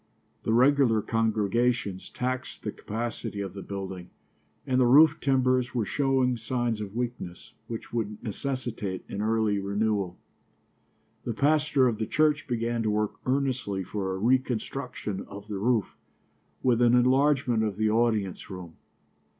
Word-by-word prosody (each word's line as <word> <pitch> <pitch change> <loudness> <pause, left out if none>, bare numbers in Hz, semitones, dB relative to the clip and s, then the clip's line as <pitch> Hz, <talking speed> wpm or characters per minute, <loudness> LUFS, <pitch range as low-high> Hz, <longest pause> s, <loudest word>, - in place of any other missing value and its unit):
The - - -1
regular 125 -2 +4
congregations 115 -2 0
taxed 130 +1 -4
the - - -2
capacity 115 -1 -4
of 100 -3 -4
the 100 - -7
building, 95 -3 -6 0.6
and 130 -2 +2
the 125 - +5
roof 150 +5 +7
timbers 130 -2 +2
were 115 -3 +1
showing 130 -1 +1
signs 115 -1 -1
of 105 0 -6
weakness 120 -8 -5
which 115 0 -7
would 105 -3 -2
necessitate 115 -4 -4
an 100 - -4
early 110 -2 +1
renewal. 100 -2 -1 1.1
The 115 - -3
pastor 145 -1 +3
of 115 -3 -1
the 110 - -1
church 150 -1 +2
began 120 -1 -1
to 110 - 0
work 105 0 0
earnestly 130 -7 0
for 95 0 -3
a - - -4
reconstruction 125 -2 -1
of 100 +1 -10
the 105 -2 -4
roof, 115 -2 +1 0.7
with 125 -2 +3
an 120 0 +5
enlargement 130 -1 +3
of 105 -3 -2
the 110 0 +2
audience 110 -4 0
room. 90 -4 -9
115 Hz, 140 wpm, -27 LUFS, 105-130 Hz, 1.1 s, roof